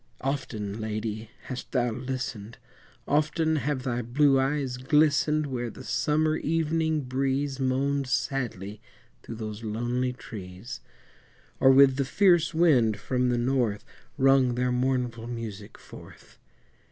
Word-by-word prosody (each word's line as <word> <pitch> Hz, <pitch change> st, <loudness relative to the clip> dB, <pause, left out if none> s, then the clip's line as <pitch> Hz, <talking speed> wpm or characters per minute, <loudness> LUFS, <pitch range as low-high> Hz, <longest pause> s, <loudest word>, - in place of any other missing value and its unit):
Often, 125 Hz, -7 st, -3 dB
Lady, 110 Hz, 0 st, -4 dB
hast 130 Hz, -1 st, -7 dB
thou 125 Hz, -2 st, +1 dB
listened, 125 Hz, -3 st, -5 dB, 0.5 s
Often 155 Hz, +2 st, +1 dB
have 135 Hz, -1 st, -2 dB
thy 125 Hz, -1 st, -1 dB
blue 135 Hz, +3 st, +3 dB
eyes 135 Hz, -2 st, -1 dB
glistened, 150 Hz, +2 st, +2 dB
Where 120 Hz, -4 st, -3 dB
the -, -, -11 dB
summer 150 Hz, +6 st, +1 dB
evening 160 Hz, 0 st, 0 dB
breeze 135 Hz, +1 st, -1 dB
Moaned 135 Hz, +1 st, 0 dB
sadly 115 Hz, -6 st, -2 dB, 0.4 s
through 115 Hz, -, -8 dB
those 110 Hz, 0 st, -6 dB
lonely 120 Hz, +4 st, -1 dB
trees, 100 Hz, -1 st, -9 dB, 0.8 s
Or 135 Hz, -, +6 dB
with 135 Hz, 0 st, +6 dB
the 140 Hz, -, +1 dB
fierce 175 Hz, +3 st, +3 dB
wind 130 Hz, -10 st, +3 dB
from 125 Hz, +4 st, 0 dB
the 120 Hz, -, +1 dB
north 120 Hz, -4 st, 0 dB, 0.3 s
Wrung 135 Hz, -2 st, +4 dB
their 125 Hz, 0 st, 0 dB
mournful 125 Hz, -2 st, -1 dB
music 110 Hz, -3 st, -7 dB
forth. -, -, -14 dB
130 Hz, 125 wpm, -27 LUFS, 115-140 Hz, 0.8 s, Or